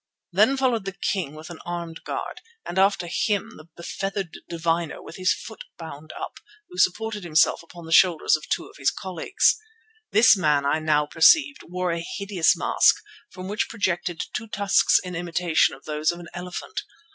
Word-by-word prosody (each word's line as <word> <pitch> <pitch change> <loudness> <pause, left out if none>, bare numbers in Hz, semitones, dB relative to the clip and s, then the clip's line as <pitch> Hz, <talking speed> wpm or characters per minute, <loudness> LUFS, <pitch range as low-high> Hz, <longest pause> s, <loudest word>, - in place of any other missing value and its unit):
Then 215 +9 +4
followed 245 -6 +1
the 195 0 -6
king 175 -7 -2
with 155 +2 -10
an 170 - -9
armed 170 -1 -6
guard, - - -5 0.2
and 180 - -2
after 195 -2 +3
him 205 +5 -1
the 155 - -13
befeathered 195 +1 -4
diviner 170 -1 -1
with - - -11
his 185 -1 +2
foot 220 - -6
bound 155 -2 -9
up, - - -7 0.3
who 360 - -8
supported 210 +2 +1
himself 155 -2 +3
upon 170 0 -13
the 165 - -9
shoulders 170 -2 +5
of 155 - -8
two - - -1
of - - -16
his 135 - +2
colleagues. 190 - 0 0.5
This 220 0 +7
man, 150 -6 +2
I 140 +3 +2
now 150 -1 +2
perceived, 285 - +4
wore 180 +1 -2
a 170 0 -2 0.2
hideous 200 -4 +2
mask, - - +4 0.3
from 185 - -9
which 210 +2 -2
projected 180 -5 -2
two 225 - -4
tusks 200 -2 +3
in 180 -1 -6
imitation 170 -1 +1
of 135 - -19
those 155 +1 0
of 175 - -9
an 170 -1 -10
elephant. 180 - -5
175 Hz, 180 wpm, -24 LUFS, 165-200 Hz, 0.5 s, This